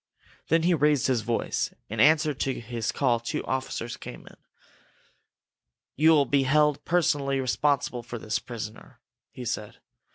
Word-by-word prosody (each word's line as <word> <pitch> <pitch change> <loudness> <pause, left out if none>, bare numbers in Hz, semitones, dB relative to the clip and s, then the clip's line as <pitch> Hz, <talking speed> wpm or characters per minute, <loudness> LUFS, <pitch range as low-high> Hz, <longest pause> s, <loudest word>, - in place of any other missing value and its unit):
Then 165 0 +3
he 175 +1 +3
raised 150 -3 +2
his 125 -4 +2
voice. 115 +2 -1 0.2
In 110 +1 -5
answer 155 +3 +5
to 135 0 -2
his 115 -1 -3
call 125 -4 +1
two 120 +6 -4
officers 130 -3 -3
came - - -10
in. - - -15 1.6
"You 155 +3 +4
will 150 -3 +5
be 140 +1 +2
held 150 +2 +2
personally 145 -5 +1
responsible 140 0 0
for 120 - -7
this 110 -1 -2
prisoner," 115 +1 -9 0.3
he 125 +1 -9
said. 105 -3 -4
135 Hz, 150 wpm, -26 LUFS, 120-150 Hz, 1.6 s, answer